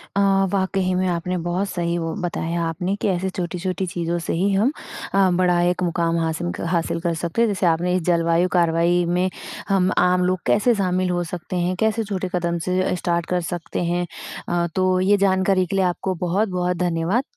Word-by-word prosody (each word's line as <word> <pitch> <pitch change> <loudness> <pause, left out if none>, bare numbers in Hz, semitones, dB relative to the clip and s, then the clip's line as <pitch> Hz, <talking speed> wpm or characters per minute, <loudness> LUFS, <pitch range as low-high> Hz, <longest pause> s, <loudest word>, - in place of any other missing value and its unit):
अ, - - +2 0.3
वाक़ई 195 0 0
ही 185 0 0
में 185 +1 +1
आपने 180 +1 -1
बहुत 185 +3 -1
सही 170 -2 -1
वो 165 -1 -2
बताया 170 -1 -2
आपने। 180 +4 -2
कैसे 190 -1 0
छोटी-छोटी 185 0 -3
चीज़ों 170 -1 -2
से 165 - -3
ही 190 +4 +1
हम 215 +7 +3 0.4
अ, 195 -1 +4
बड़ा 180 0 +2
एक 180 +1 +1
मुकाम 170 -1 0
हासिन 165 +2 -1 0.2
हासिल 170 -1 0
कर 170 -1 0
सकते 170 +6 -2
हैं 235 - +4
जैसे 200 -3 -1
आपने 175 +1 +2
इस 185 - +1
जलवायु 170 0 +2
कार्यवाही 170 0 +3
में 180 +2 +1 0.4
हम 190 -2 +3
आम 180 0 +3
लोग 185 0 +1
कैसे 230 +4 +4
शामिल 185 -2 0
हो 175 0 0
सकते 175 +2 -6
हैं? 180 +1 0
कैसे 220 +1 +1
छोटे 195 -3 -3
कदम 170 -1 0
से 185 0 +1
अ, 185 - 0
स्टार्ट 170 -1 -1
कर 180 0 -1
सकते 175 +1 -4
हैं? 175 +1 0 0.4
अ, 175 0 +1
तो 185 -1 +2
ये 200 +2 +4
जानकारी 190 -1 +2
के 190 - -4
लिए 190 -1 +3
आपको 180 +1 -1
बहुत-बहुत 180 -1 0
धन्यवाद। 175 +7 0
180 Hz, 195 wpm, -22 LUFS, 170-185 Hz, 0.4 s, अ